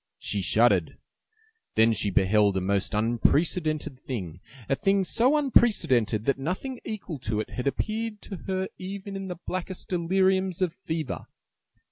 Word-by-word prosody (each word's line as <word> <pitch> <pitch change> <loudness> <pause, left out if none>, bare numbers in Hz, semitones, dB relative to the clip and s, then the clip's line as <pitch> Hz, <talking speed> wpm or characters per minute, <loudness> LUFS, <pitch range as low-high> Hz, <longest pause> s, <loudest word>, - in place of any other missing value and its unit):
She - - -2
shuddered. - - +3 0.8
Then 115 +1 +5
she 105 -1 0
beheld 100 +1 +3
a - - +3
most 100 +2 0
unprecedented 150 +6 +1
thing, 90 - -5 0.3
a 135 - +2
thing 195 +3 +2
so 250 +10 +3
unprecedented 160 - +3
that 140 -1 +1
nothing 190 - -3
equal 190 -8 -5
to 110 -4 -2
it 110 - -4
had 125 +1 -3
appeared 215 - -2
to 195 - -7
her 190 0 -1
even 195 +1 -6
in 195 0 -5
the 180 -2 -5
blackest 185 0 -4
deliriums 190 +1 +2
of 180 -3 0
fever. 160 -4 -4
165 Hz, 145 wpm, -27 LUFS, 115-195 Hz, 0.8 s, Then